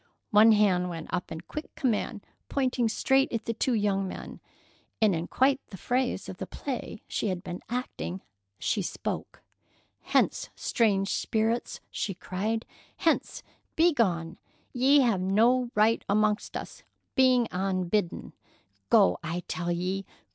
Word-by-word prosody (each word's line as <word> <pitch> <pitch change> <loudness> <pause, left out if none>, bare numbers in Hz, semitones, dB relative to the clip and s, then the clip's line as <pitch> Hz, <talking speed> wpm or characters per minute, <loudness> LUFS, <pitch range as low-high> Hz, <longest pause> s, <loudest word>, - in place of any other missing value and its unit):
One 220 +1 +7
hand 185 -4 +3
went 165 -2 -7
up 180 - -2
in 160 - -5
quick 305 - -8
command, 225 -3 -1 0.2
pointing 255 -4 +1
straight 265 +5 +2
at 230 -1 -3
the 230 - -1
two 240 +2 0
young 200 -2 +1
men, - - -8 0.6
and 215 -3 +4
in 165 0 -2
quite 270 +1 +3
the 190 - -10
phrase 250 +5 -1
of - - -7
the - - -5
play 250 -5 -5
she - - -2
had 185 -2 -2
been 175 0 -6
acting 95 - -4 0.4
she - - 0
spoke: - - -5 0.6
"Hence, - - +1
strange 200 -4 +1
spirits!" 225 +1 -1
she 195 - -3
cried. 210 +5 -2 0.3
"Hence! - - 0 0.3
Begone! 195 - +2 0.3
Ye 270 +3 +5
have 230 -8 +2
no 235 +6 +3
right 215 +2 +3
amongst 210 +1 +1
us, - - -8 0.3
being 255 -3 +4
unbidden. 185 0 -1 0.6
'Go, 90 0 +5
I 170 +2 -4
tell 175 -1 -2
ye! 185 +2 -2
210 Hz, 140 wpm, -28 LUFS, 185-245 Hz, 0.6 s, One